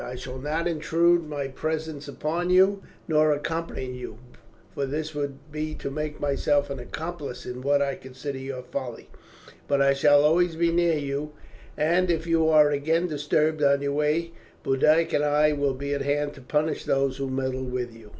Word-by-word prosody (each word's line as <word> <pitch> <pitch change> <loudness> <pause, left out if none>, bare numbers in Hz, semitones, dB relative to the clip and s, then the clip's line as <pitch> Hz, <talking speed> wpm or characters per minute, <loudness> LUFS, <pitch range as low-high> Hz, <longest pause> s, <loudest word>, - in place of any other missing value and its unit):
I 125 - -6
shall 130 +1 -7
not 155 +5 -1
intrude 170 0 +2
my 145 -2 -3
presence 155 +1 -4
upon 165 +5 -2
you, 190 +2 +4 0.3
nor 155 -1 +4
accompany 160 -1 -3
you, 125 -3 -8 0.6
for 140 - -2
this 155 +3 -3
would 140 -2 -3
be 155 0 -3
to 140 - -5
make 150 +1 -4
myself 145 0 +1
an 135 - -4
accomplice 155 +1 -6
in 125 0 -6
what 140 +1 +2
I 140 -1 -1
consider 130 +1 -7
your 130 -1 -6
folly; 125 -2 -6 0.6
but 140 - +2
I 140 0 +4
shall 145 +1 +5
always 165 +2 +3
be 170 +1 +2
near 170 -1 +2
you, 145 +1 -3 0.4
and 175 +4 +2
if 165 -1 0
you 165 -1 +3
are 150 -2 +6
again 160 +4 +1
disturbed 155 0 0
on 140 -1 +3
your 140 0 -1
way 150 +3 0 0.3
Boduoc 155 +5 +3
and 145 - +2
I 150 +1 +3
will 140 -2 0
be 140 +2 -3
at 140 - -2
hand 145 +1 0
to 135 - -13
punish 150 +4 -1
those 135 -1 +1
who 135 -1 -3
meddle 130 0 -2
with 125 -2 -4
you." 110 -2 -14
145 Hz, 185 wpm, -26 LUFS, 140-160 Hz, 0.6 s, are